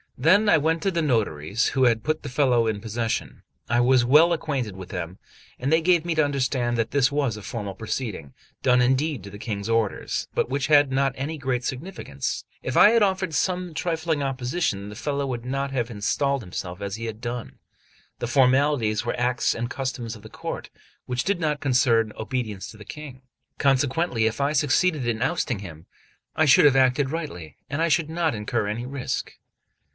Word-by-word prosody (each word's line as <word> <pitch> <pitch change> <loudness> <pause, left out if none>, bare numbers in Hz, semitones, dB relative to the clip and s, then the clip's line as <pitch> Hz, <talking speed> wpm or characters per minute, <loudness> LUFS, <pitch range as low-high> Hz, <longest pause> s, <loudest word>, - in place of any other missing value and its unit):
Then 205 +6 +4
I 165 - +6
went 160 +2 0
to 195 - +1
the 170 -2 0
notaries 110 - 0
who 130 -2 +2
had 115 -3 +2
put 155 +4 -1
the - - -6
fellow 125 -3 +2
in 110 -2 -1
possession. 110 - -3 0.3
I 120 +1 +3
was 125 0 +4
well 155 +7 +6
acquainted 135 - -2
with 95 -1 -9
them; 90 0 -5 0.4
and 135 +4 -1
they 160 +1 +4
gave 170 -1 +3
me 170 - 0
to 155 -1 +3
understand 130 -3 0
that 115 -1 -1
this 140 0 +3
was 140 -7 0
a - - -8
formal 105 -2 -5
proceeding, 110 - -4 0.3
done 125 -1 +4
indeed 130 - +1
at - - -9
the 100 - -10
King's 105 -2 -4
orders, 115 -3 -1
but - - +1
which 135 0 -1
had 145 -2 +5
not 135 0 +1
any 150 +4 -4
great 130 -2 -1
significance; 130 - -4 0.2
if 130 - -4
I 210 - +8
had 230 -1 +4
offered 190 -3 0
some 180 +2 -1
trifling 160 -3 -1
opposition 130 - -2
the 105 - -9
fellow 140 +3 -2
would 120 -3 -4
not 135 +1 -2
have 120 -3 -1
installed 135 +6 0
himself 90 -1 -6
as 100 -1 -3
he 115 +1 -6
had 110 0 -6
done. 120 -1 -5 0.6
The - - -2
formalities 130 -3 +3
were 120 - -2
acts 125 0 +1
and 120 +1 -3
customs 125 -4 -4
of 105 - -13
the 110 - -11
court, - - -6 0.4
which 125 0 -1
did 195 -2 0
not 150 -3 -1
concern 120 -5 +3
obedience 110 -4 -4
to 110 - -14
the 105 - -12
King; 140 0 -9 0.4
consequently, 135 -2 +2
if 110 +3 -1
I 140 +2 +1
succeeded 150 -1 +2
in 115 -1 -1
ousting 125 -3 0
him, 85 -4 -10 0.5
I 160 - +3
should 145 - +6
have 140 -2 +6
acted 130 +1 +3
rightly, 115 - -6
and 165 +3 +1
should 155 +1 +2
not 160 -4 0
incur 105 +1 -1
any 115 +4 -3
risk. 135 0 -4
130 Hz, 195 wpm, -24 LUFS, 115-150 Hz, 0.6 s, I